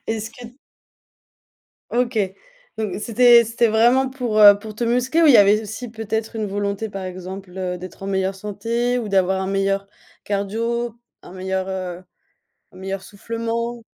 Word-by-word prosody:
Est-ce 220 0 -3
que 240 +2 -13 1.3
OK 240 -1 0 0.6
donc 215 -3 -2
c'était 235 +1 +6
c'était 230 +1 +1
vraiment 240 +5 +3
pour, 245 -5 -2
heu, 205 -1 +9
pour 215 0 -9
te 235 - -2
muscler 250 +7 +1
ou - - +6
il - - +8
y - - +8
avait 205 +2 +5
aussi 225 +3 -7
peut-être 220 0 -4
une 215 -1 -2
volonté 200 +2 -3
par 195 -1 -6
exemple, 185 +1 -8
heu, 180 -1 -3
d'être 185 +1 -10
en - - -5
meilleure 190 0 -1
santé 230 +5 -2
ou 230 -3 -4
d'avoir 190 -1 +2
un 190 - -2
meilleur 195 0 0 0.4
cardio, 225 +4 -2 0.3
un - - -12
meilleur, 190 0 -3
heu 185 -1 -5 0.7
un - - -17
meilleur 195 +1 -5
soufflement? 230 +3 -4
215 Hz, 165 wpm, -21 LUFS, 195-235 Hz, 1.3 s, heu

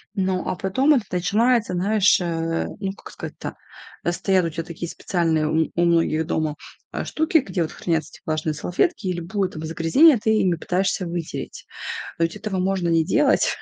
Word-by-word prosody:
ну 190 -1 0
а - - -1
потом 260 +12 +2
это 240 - +1
начинается, 215 +5 +2
знаешь, 200 +3 +3
э, 165 -1 -1
ну, 195 -2 -2
как - - -12
сказать-то, - - -7 0.5
когда 175 - 0
стоят 185 0 +2
у - - 0
тя 165 +1 -4
такие 170 0 -6
специальные 165 -4 0
у 160 +1 +1
у 175 - +2
многих 165 -2 +2
дома, 155 -2 -1 0.4
а, - - -3
штуки, 320 +2 +2
где 225 - -3
вот 160 - -1
хранятся 160 -3 -1
эти - - -17
влажные 155 0 -1
салфетки, 185 - -1
и 185 - +1
любое 185 +3 -2
там 160 -2 -7
загрязнение 165 - +5
ты 220 - -1
ими 190 -5 +3
пытаешься 185 +2 -1
вытереть. 170 -1 -5 0.5
А 165 - +3
ведь 165 +4 -2
этого 210 -2 -3
можно 185 -1 0
не 165 -1 +3
делать 295 - +2
180 Hz, 185 wpm, -23 LUFS, 165-200 Hz, 0.5 s, загрязнение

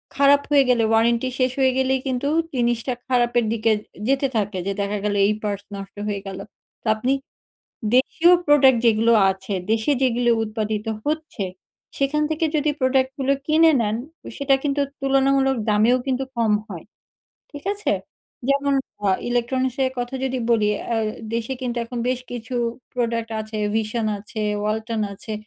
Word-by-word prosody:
খারাপ 280 0 +5
হয়ে 285 -1 +6
গেলে 240 -2 +3
ওয়ারেন্টি 235 +3 +2
শেষ 255 0 +2
হয়েই 260 -1 +3
গেলেই 265 0 +2
কিন্তু 260 +1 -1 0.3
জিনিসটা 240 +1 0
খারাপের 240 -2 +2
দিকে 225 0 +1
এ 210 - -4 0.3
যেতে 275 +1 +2
থাকে, 205 -2 -1
যে 200 - 0
দেখা 200 +1 -1
গেলো 205 -1 0
এই 210 - +2
পার্টস 200 -1 -3
নষ্ট 195 0 -9
হয়ে 200 -2 -2
গেলো, 195 0 -6 0.4
তো - - -6
আপনি 245 +5 0 0.8
দেশীয় 325 +7 +4
প্রোডাক্ট 275 -4 +6
যেগুলো 230 +1 +4 0.2
আছে 190 +1 -6 0.2
দেশে, 225 +5 +1
যেগুলো 245 -2 +2
উৎপাদিত 215 0 -3 0.2
হচ্ছে, 310 -8 -2 0.5
সেখান 280 +2 +1
থেকে 315 +1 0
যদি 300 0 +2
প্রোডাক্টগুলো 265 +1 +1
কিনে 320 +1 +5
নেন, 210 0 0 0.3
ও - - -8
সেটা 280 -1 +3
কিন্তু 285 -1 0 0.2
তুলনামূলক 270 0 +2
দামেও 220 +4 +4 0.4
কম 225 -2 +2 0.2
হয়, 175 -5 -8 0.7
ঠিক 290 -1 -9
আছে? 415 - -1 0.6
যেমন 280 0 +2 0.3
আ - - +4 0.2
ইলেকট্রনিক্সের 260 +2 0
কথা 245 +2 -3
যদি 260 -1 -1
বলি, 215 -3 +3 0.2
অ্যা 230 -1 0 0.4
দেশে 230 +2 -2
কিন্তু 245 -1 -2
এখন 240 +1 -6
বেশ 255 0 0
কিছু 240 +1 -6 0.4
প্রোডাক্ট 230 -2 -1
আছে, 215 0 -6 0.2
VISION 220 +1 -1
আছে, 215 +1 -6 0.2
Walton 220 +1 -2
আছে, 215 +3 -8
245 Hz, 155 wpm, -22 LUFS, 220-270 Hz, 0.8 s, হয়ে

